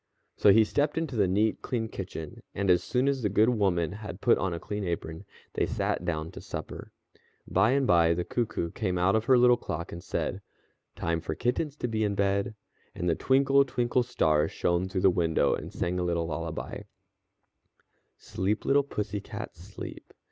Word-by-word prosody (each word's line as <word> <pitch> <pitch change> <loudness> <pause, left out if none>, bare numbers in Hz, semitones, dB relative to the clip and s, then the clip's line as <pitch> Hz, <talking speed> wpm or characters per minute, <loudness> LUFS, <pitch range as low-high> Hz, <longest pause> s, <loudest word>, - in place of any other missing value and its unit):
So - - +4
he 110 +3 +6
stepped 145 +9 0
into 160 -6 -2
the 100 -4 +3
neat, 105 +4 +1
clean 115 -3 -2
kitchen, 90 -7 -7
and 100 -1 +2
as 90 - +3
soon 130 +1 0
as 140 -2 +1
the 105 - +1
good 105 +4 +4
woman 95 -8 +1
had 105 -2 -7
put 120 - +3
on 95 0 -1
a 85 - -3
clean 105 +3 -4
apron, 85 0 -4 0.3
they - - 0
sat - - -1
down 80 -1 -2
to - - -9
supper. - - -7 0.6
By 110 +7 +3
and 140 -1 +2
by 85 -4 +4
the 90 - -1
cuckoo 105 -8 -2
came 95 -5 -2
out 95 +3 +3
of 110 0 +1
her 130 0 +5
little 125 0 +6
clock 85 +2 -5
and 85 - -8
said: - - -3 0.5
"Time 85 0 -1
for 80 -1 -4
kittens 135 - -1
to 125 - -3
be 110 -2 -1
in 100 -1 0
bed," 100 +3 0 0.4
and 90 - -3
the 85 - +3
twinkle, 135 +7 +4
twinkle 125 -1 0
star 80 -11 +2
shone 90 +2 0
through 95 -1 -2
the 95 -1 +5
window, 85 -3 +2
and - - -5
sang 90 +1 -2
a - - 0
little 85 -1 0
lullaby: 80 0 -5 1.4
"_Sleep, 100 +3 -2
little 140 +1 +4
pussy 105 -7 -4
cat, - - -7
sleep. - - -10
100 Hz, 190 wpm, -28 LUFS, 85-120 Hz, 1.4 s, he